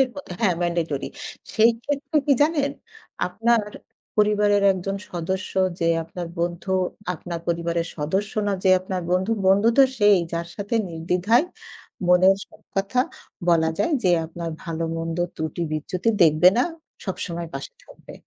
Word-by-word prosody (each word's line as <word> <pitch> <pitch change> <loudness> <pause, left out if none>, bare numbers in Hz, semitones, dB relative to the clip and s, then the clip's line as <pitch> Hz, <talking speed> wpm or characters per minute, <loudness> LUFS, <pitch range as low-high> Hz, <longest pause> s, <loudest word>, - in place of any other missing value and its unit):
মত 285 - -8
হ্যাঁ, 190 -7 +2
ম্যান্ডেটরি। 170 -5 -1 0.5
সেই 225 +2 +5
ক্ষেত্রে 290 +2 -1
কি 285 - +5
জানেন? 295 -2 +2 0.6
আপনার 225 +5 +2 0.5
পরিবারের 210 -1 +3
একজন 190 +1 -3 0.2
সদস্য 185 +2 -3 0.3
যে 165 - +1 0.2
আপনার 170 +1 -6
বন্ধু, 175 +2 -2 0.4
আপনার 170 0 -6
পরিবারের 170 0 -1
সদস্য 190 +8 -1 0.2
না, 200 - +1
যে 190 - +4
আপনার 185 0 -4
বন্ধু। 185 +4 +1 0.2
বন্ধু 200 +3 +5
তো 275 - +9
সেই 205 -2 +6 0.2
যার 170 0 -2
সাথে 205 +2 -3
নির্দ্বিধায় 180 - +2 0.6
মনের 185 +2 +6
সব - - -20
কথা 195 +6 0 0.5
বলা 160 -1 +4
যায়। 335 - +1
যে 185 - +4 0.2
আপনার 170 +1 -6
ভালো-মন্দ 165 0 -3 0.2
ত্রুটি-বিচ্যুতি 160 +5 -2
দেখবে 155 +3 +6
না, 245 - +4 0.4
সবসময় 170 -3 -4
পাশে 135 0 -6
থাকবে। - - -14
180 Hz, 135 wpm, -23 LUFS, 170-205 Hz, 0.6 s, তো